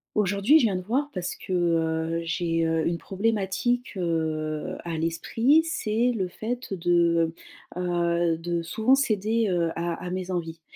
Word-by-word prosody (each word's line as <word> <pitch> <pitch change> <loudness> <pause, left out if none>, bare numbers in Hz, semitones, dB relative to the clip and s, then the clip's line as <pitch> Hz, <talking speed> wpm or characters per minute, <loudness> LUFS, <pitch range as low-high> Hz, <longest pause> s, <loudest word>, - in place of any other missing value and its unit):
Aujourd'hui 205 +8 +4
je - - +2
viens 195 -3 -1
de - - -4
voir 260 +10 -1
parce 180 -1 -3
que, - - -9
heu, 165 -1 +1
j'ai, 165 0 0
heu, 160 -1 +1
une 170 0 0
problématique, 220 +4 -1
heu, 160 -3 -2
à 165 -1 -3
l'esprit, 225 - +2
c'est 245 -7 0
le 190 -4 -1
fait 235 +4 -5
de, 170 -2 +2 0.4
heu 180 - -3
heu, 170 -1 +1
de 170 +1 -2
souvent 220 +10 +3
céder, 220 -3 +1
heu, 170 -2 +1
à 170 0 -2
à 180 - -5
mes 185 0 -3
envies. 165 -2 -4
175 Hz, 160 wpm, -26 LUFS, 165-215 Hz, 0.4 s, Aujourd'hui